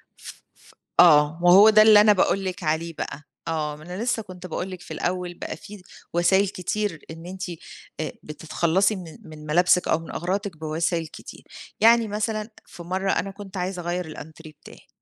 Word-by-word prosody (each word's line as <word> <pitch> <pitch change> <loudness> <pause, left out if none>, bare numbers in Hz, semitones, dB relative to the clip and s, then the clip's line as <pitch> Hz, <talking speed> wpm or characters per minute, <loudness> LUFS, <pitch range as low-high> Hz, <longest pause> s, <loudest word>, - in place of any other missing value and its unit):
ف - - -12
ف - - -22 0.3
آه، 150 -1 +6
وهو 195 +5 +8
ده 215 0 +7
اللي 215 -1 +8
أنا 210 0 +6
باقول 195 0 +1
لِك 185 0 -4
عليه 160 +2 -1
بقى. 145 +1 -6 0.2
آه، 155 -2 -2
ما 155 - -14
أنا 180 +6 -6
لسه 240 -2 0
كنت 185 -1 -10
باقول 180 +3 -4
لِك 180 -1 -8
في - - -9
الأول 180 0 -3
بقى - - -7
في 205 -2 -12 0.3
وسايل 190 +3 +3
كتير 195 -3 -3
إن 165 +1 -10
أنتِ 185 +1 -6 0.5
أ 155 - -3
بتتخلصي 165 +6 0
من 170 -4 -9
من 155 -1 -12
ملابسِك 180 +3 +3
أو 160 - +2
من 165 - -10
أغراضِك 190 0 -3
بوسايل 160 +1 -2
كتير. - - -12 0.4
يعني 230 0 +5
مثلًا 215 +1 -3 0.2
في 170 - -12
مَرّة 190 +2 -1
أنا 195 +3 -1
كنت 195 -1 -10
عايزة 180 0 -3
أغيَّر 175 +1 -3
الأنتريه 155 0 -11
بتاعي، - - -15
180 Hz, 185 wpm, -24 LUFS, 165-200 Hz, 0.5 s, وهو